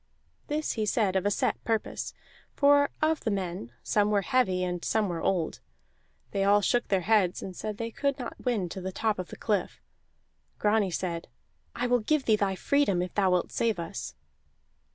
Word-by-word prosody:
This 305 +1 -1
he 220 -2 -1
said 205 -3 +1
of 190 +1 +2
a - - +4
set - - 0
purpose, 225 -2 -2 0.4
for 285 0 +5
of 315 0 +3
the 225 - -2
men 180 - -3
some 210 -1 +2
were 205 -2 +2
heavy 205 -9 +2
and 180 -1 -3
some 220 -2 +1
were 170 -2 -3
old. 175 -4 0 0.7
They 195 -1 0
all 205 +1 +5
shook 240 +4 +1
their 195 -2 +2
heads 195 -2 +2
and 185 - -7
said 210 +1 -4
they 230 0 -4
could 280 +3 -1
not 250 - -7
win 230 -8 0
to 190 - -6
the 190 +1 -4
top 215 +1 0
of 180 - -4
the - - -10
cliff. 205 -4 -1 0.8
Grani 210 -1 +2
said: 170 -1 -3 0.5
"I 245 - -1
will 245 0 +3
give 280 +5 +1
thee 220 - +5
thy 200 -2 0
freedom 200 -6 +2
if 180 - -6
thou 195 -2 +3
wilt 180 -1 +1
save 225 -4 +1
us." 165 -8 -5
205 Hz, 195 wpm, -28 LUFS, 185-230 Hz, 0.8 s, for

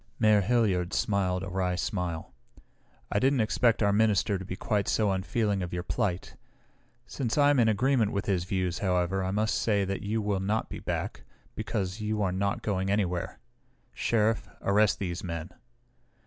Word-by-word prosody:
Mayor 105 -1 +4
Hilliard 100 -5 +1
smiled 95 -3 0
a 95 - -5
wry 90 -1 -1
smile. 90 -5 -3 0.8
"I 100 - +2
didn't 135 +1 +3
expect 110 +1 +2
our 100 -1 +3
minister 100 -3 +2
to - - -6
be 95 0 -5
quite 105 +1 -1
so 105 -3 +2
unfeeling 100 +1 0
of 90 -1 -4
your 90 0 -2
plight. 90 -1 -2 0.7
Since 120 -2 -3
I 145 0 +5
am 145 - +3
in 115 - +4
agreement 115 0 +2
with 100 - -2
his 90 -4 0
views, 90 -2 -1
however, 95 0 0
I 95 - -1
must 105 +3 0
say 100 -3 +2
that 100 0 -3
you 105 +2 -1
will 105 -2 0
not 105 +4 -1
be - - -6
back, - - -4 0.3
because 95 +2 -3
you 105 0 -1
are 95 - +1
not 100 +2 -1
going 95 -2 -1
anywhere. 95 -4 -1 0.6
Sheriff, 110 -3 +1
arrest 105 +1 +3
these 90 -2 -4
men!" 85 -1 -5
100 Hz, 175 wpm, -28 LUFS, 95-110 Hz, 0.8 s, I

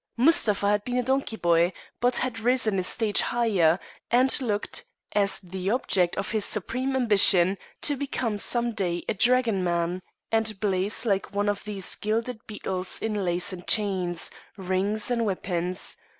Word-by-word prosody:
Mustapha 230 - +3
had 205 0 +1
been 245 +2 -3
a 250 - +1
donkey 265 -2 -1
boy, 170 -2 +2 0.3
but 245 +1 +2
had 255 -3 -2
risen 225 -4 +1
a - - -1
stage 210 +2 +1
higher, 195 -8 +2 0.3
and 260 +3 +4
looked, 210 -4 -2 0.3
as 200 -1 +3
the 185 +1 -5
object 195 -7 +1
of 195 - -3
his 215 -2 0
supreme 255 +7 -2
ambition, 195 -6 +5 0.3
to 290 - +3
become 255 -6 -3
some 240 +2 +1
day 175 -5 -2
a - - 0
dragoman, 185 -8 +1 0.3
and 220 -2 0
blaze 200 +2 0
like 200 -1 -1
one 205 +1 0
of 205 0 -1
these 200 -3 -3
gilded 220 +3 -2
beetles 190 -4 -3
in 220 -1 -2
lace 175 +1 0
and 175 -1 -10
chains, 185 -5 +1 0.3
rings 195 +4 -1
and 235 -1 +1
weapons. 180 -2 -2
205 Hz, 155 wpm, -26 LUFS, 185-235 Hz, 0.3 s, ambition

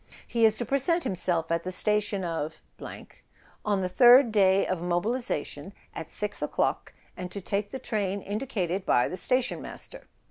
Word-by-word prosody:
"He 230 -1 +2
is 220 -1 +3
to 240 - -3
present 280 - +1
himself 175 -3 -1
at 170 0 0
the 185 - -4
station 210 0 +1
of 160 -2 -4 1.0
on 205 -2 0
the 185 - 0
third 245 +5 +6
day 195 -2 +4
of 185 -3 -2
mobilisation 210 +9 -2 0.2
at - - -7
6 - - -2
o'clock, - - -1 0.2
and 180 0 -7
to 200 - -5
take 200 +2 -2
the 265 - -5
train 205 -6 -2
indicated 200 -4 -3
by 120 -9 +3
the - - -5
station 255 +5 +1
master. - - -8
200 Hz, 165 wpm, -27 LUFS, 180-235 Hz, 1.0 s, third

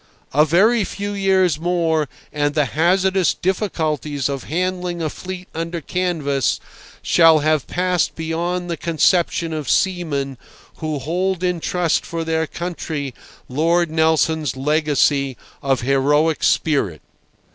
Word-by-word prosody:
A 150 +3 +5
very 205 +8 +4
few 200 +2 -4
years 190 -5 +2
more 165 -3 0 0.2
and 145 0 0
the 150 -2 +3
hazardous 185 +3 +2
difficulties 155 - -1
of 140 -1 -4
handling 180 +1 -2
a 155 -2 -2
fleet 185 0 -7
under 165 +1 -3
canvas 155 -6 -1 0.4
shall 165 -2 +6
have 155 -2 +1
passed 180 -1 0
beyond 170 +2 -2
the 170 -1 -3
conception 170 0 +1
of 155 -4 -4
seamen 145 -8 0 0.4
who 155 -2 -3
hold 180 +6 -1
in 180 -1 0
trust 175 -1 0
for 165 -1 -4
their 160 0 0
country 160 -5 -4 0.3
Lord 165 +5 +1
Nelson's 160 -3 +1
legacy 145 -2 +1 0.2
of 135 -2 +1
heroic 145 +5 +2
spirit. 120 - +1
160 Hz, 125 wpm, -20 LUFS, 150-180 Hz, 0.4 s, shall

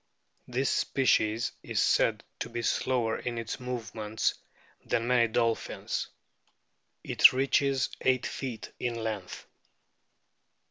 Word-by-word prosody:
This 130 +2 0
species 115 -4 +2
is - - -2
said - - +3 0.2
to 115 - -4
be 120 0 -4
slower 120 -2 0
in 120 -1 -4
its 115 -1 -4
movements 110 -3 -2 0.5
than 115 - 0
many 120 -1 +4
dolphins. 115 0 -1 1.0
It - - +7
reaches 135 0 +2
eight 130 -1 +2
feet 125 -5 -5
in 120 -1 -1
length. 110 -5 -5
120 Hz, 105 wpm, -29 LUFS, 110-125 Hz, 1.0 s, It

